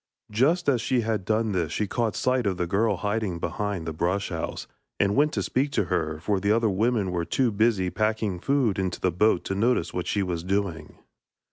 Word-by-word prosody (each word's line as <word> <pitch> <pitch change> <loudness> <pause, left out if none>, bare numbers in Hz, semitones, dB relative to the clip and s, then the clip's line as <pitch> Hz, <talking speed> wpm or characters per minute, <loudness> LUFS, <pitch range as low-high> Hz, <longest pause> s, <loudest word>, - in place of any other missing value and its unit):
Just 150 +11 +2
as 130 -5 +3
she 125 +1 +1
had 110 -4 -2
done 110 +1 +1
this 85 -5 -1
she 105 - 0
caught 115 +2 -1
sight 130 -3 +1
of 95 -2 -1
the 90 - 0
girl 105 +4 +1
hiding 105 -1 -1
behind 100 0 -3
the 80 - -3
brush 90 +5 -1
house, 85 -2 -4 0.3
and 100 0 +2
went 150 +2 +3
to - - -1
speak 135 +3 0
to - - +2
her; 80 -3 -1
for 100 +4 0
the 100 +2 +1
other 115 -1 +3
women 105 -1 +1
were 85 -1 -1
too 125 +7 +1
busy 100 -3 +1
packing 110 -3 0
the - - -15
food 130 -9 +1
into 95 -3 -2
the 90 - +1
boat 90 +1 +2
to - - -3
notice 115 +6 +1
what 90 - -3
she 100 - 0
was 85 -3 -3
doing. 90 -5 -2
100 Hz, 220 wpm, -26 LUFS, 90-115 Hz, 0.3 s, as